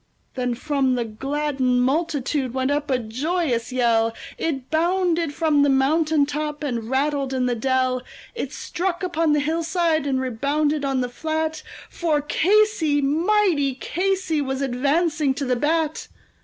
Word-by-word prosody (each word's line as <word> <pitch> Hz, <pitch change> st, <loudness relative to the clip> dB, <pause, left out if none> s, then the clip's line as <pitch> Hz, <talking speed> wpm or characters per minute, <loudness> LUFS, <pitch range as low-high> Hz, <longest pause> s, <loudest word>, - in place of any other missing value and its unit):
Then 250 Hz, -2 st, -1 dB
from 270 Hz, 0 st, 0 dB
the 240 Hz, -1 st, -1 dB
gladdened 265 Hz, +1 st, 0 dB
multitude 275 Hz, -2 st, -1 dB
went 260 Hz, +1 st, 0 dB
up 295 Hz, +1 st, -1 dB
a 260 Hz, -, +2 dB
joyous 250 Hz, +1 st, -2 dB
yell, 230 Hz, -2 st, +2 dB, 0.2 s
It 270 Hz, -5 st, -3 dB
bounded 340 Hz, -1 st, +1 dB
from 300 Hz, -1 st, +2 dB
the 285 Hz, -, +4 dB
mountain 295 Hz, +3 st, +3 dB
top, 300 Hz, +1 st, -4 dB
and 235 Hz, -5 st, -3 dB
rattled 275 Hz, 0 st, 0 dB
in 255 Hz, -1 st, +1 dB
the 250 Hz, -, +1 dB
dell, 255 Hz, +1 st, 0 dB, 0.3 s
It 470 Hz, -, -4 dB
struck 360 Hz, 0 st, -3 dB
upon 330 Hz, -3 st, +1 dB
the 295 Hz, -, +3 dB
hillside, 320 Hz, 0 st, 0 dB
and 265 Hz, -2 st, +1 dB
rebounded 285 Hz, +4 st, 0 dB
on 270 Hz, -2 st, 0 dB
the 250 Hz, -, -1 dB
flat; 315 Hz, +3 st, -2 dB, 0.3 s
For 320 Hz, -4 st, 0 dB
Casey, 330 Hz, 0 st, +2 dB
mighty 310 Hz, -1 st, +2 dB
Casey, 370 Hz, +1 st, -1 dB
was 265 Hz, 0 st, -2 dB
advancing 285 Hz, +3 st, +1 dB
to 280 Hz, 0 st, -3 dB
the 250 Hz, -1 st, +1 dB
bat. 315 Hz, +4 st, 0 dB
290 Hz, 145 wpm, -23 LUFS, 260-320 Hz, 0.3 s, the